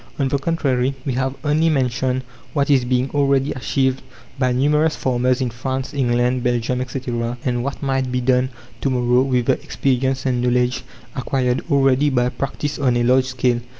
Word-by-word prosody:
On 140 - +1
the 140 - 0
contrary, 135 -4 0
we 135 - -1
have 130 +1 -1
only 155 +2 +2
mentioned 130 -2 0 0.3
what 145 0 +1
is 130 -3 +4
being 125 +1 0
already 140 -1 +2
achieved 130 +1 0 0.4
by 130 -1 +2
numerous 150 +5 +2
farmers 125 0 0
in 125 -2 -1
France, 130 +2 -4
England, 125 -1 +1
Belgium, 125 +1 0
etc., 120 -2 -3
and 120 -2 0
what 140 +2 -4
might 135 -2 0
be 125 - 0
done 125 +1 +2 0.3
to 135 - +1
morrow 125 -1 +2
with 125 -2 +1
the - - +1
experience 130 0 -1
and 125 -2 +1
knowledge 125 0 +1 0.3
acquired 130 -1 0
already 140 0 +3
by 125 -2 +1
practice 145 +3 -4
on 125 -4 +2
a 120 - +1
large 130 +2 +4
scale. 125 -2 0
130 Hz, 175 wpm, -20 LUFS, 125-135 Hz, 0.4 s, is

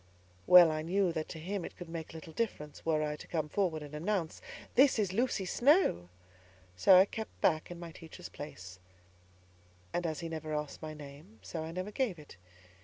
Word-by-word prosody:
Well 175 -2 +9
I 155 0 -2
knew 180 +3 +1
that 160 -1 -3
to 165 - -7
him 185 +4 -4
it - - -8
could 175 - -8
make 165 -1 -7
little 160 0 -9
difference, 150 -10 -3
were 155 -2 +1
I 150 0 -2
to - - -11
come 155 -3 -1
forward 165 -4 0
and 145 0 -10
announce, 170 +1 -2 0.3
"This 270 0 +5
is 200 -4 0
Lucy 230 -3 0
Snowe!" 240 - +3 0.7
So 185 - +7
I 190 - +8
kept 220 +2 -7
back 155 -2 +2
in 175 -1 -8
my 170 -1 -7
teacher's 160 0 -10
place; 90 -11 -9 1.1
and 175 -1 0
as 155 0 -3
he 165 - -4
never 155 -1 -4
asked 150 -1 -4
my 155 -1 -6
name, 150 +8 -12
so 160 -2 -5
I 160 - -6
never 185 +4 -4
gave 220 -6 -1
it. 150 - -13
165 Hz, 195 wpm, -32 LUFS, 155-190 Hz, 1.1 s, Well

